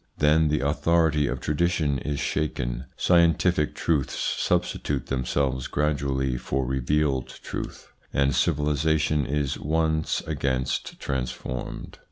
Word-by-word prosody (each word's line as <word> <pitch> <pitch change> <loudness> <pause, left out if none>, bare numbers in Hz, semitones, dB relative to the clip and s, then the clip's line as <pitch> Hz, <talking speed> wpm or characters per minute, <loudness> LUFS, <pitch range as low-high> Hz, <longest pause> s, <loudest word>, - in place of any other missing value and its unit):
Then 75 +1 +4
the 75 -2 +1
authority 75 +1 +2
of - - -2
tradition 75 -3 +1
is 75 +2 -3
shaken, 65 -5 -2
scientific 85 -2 +3
truths 75 -6 0
substitute 70 -3 0
them 65 -1 -2
selves 65 -1 0
gradually 70 -3 0
for 65 +1 -1
revealed 65 +1 0
truth, - - -7 0.2
and 70 0 +2
civilisation 75 0 +1
is 70 -1 -1
once 80 +1 0
against 65 -1 -2
transformed. 65 -1 -4
75 Hz, 110 wpm, -26 LUFS, 65-75 Hz, 0.2 s, Then